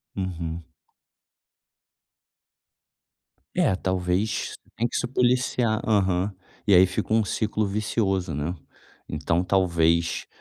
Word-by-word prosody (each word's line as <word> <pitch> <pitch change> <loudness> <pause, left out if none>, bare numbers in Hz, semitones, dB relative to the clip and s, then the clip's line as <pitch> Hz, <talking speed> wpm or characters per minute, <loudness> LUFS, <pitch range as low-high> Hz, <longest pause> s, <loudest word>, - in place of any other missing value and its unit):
Uhum. 85 -3 -4 2.9
É 95 - +3
talvez, 95 +2 -1 0.2
tem 120 - 0
que - - -7
se - - 0
policiar 125 -3 +1
Aham, 95 -2 +2 0.4
e 100 - +5
aí, 95 +1 +8
fica 100 +4 -3
um 110 -2 +3
ciclo 110 +1 -1
vicioso, 95 -4 -1
né. 75 +5 -2 0.6
Então, 80 +3 0
talvez, 85 -3 +2
95 Hz, 100 wpm, -25 LUFS, 90-110 Hz, 2.9 s, aí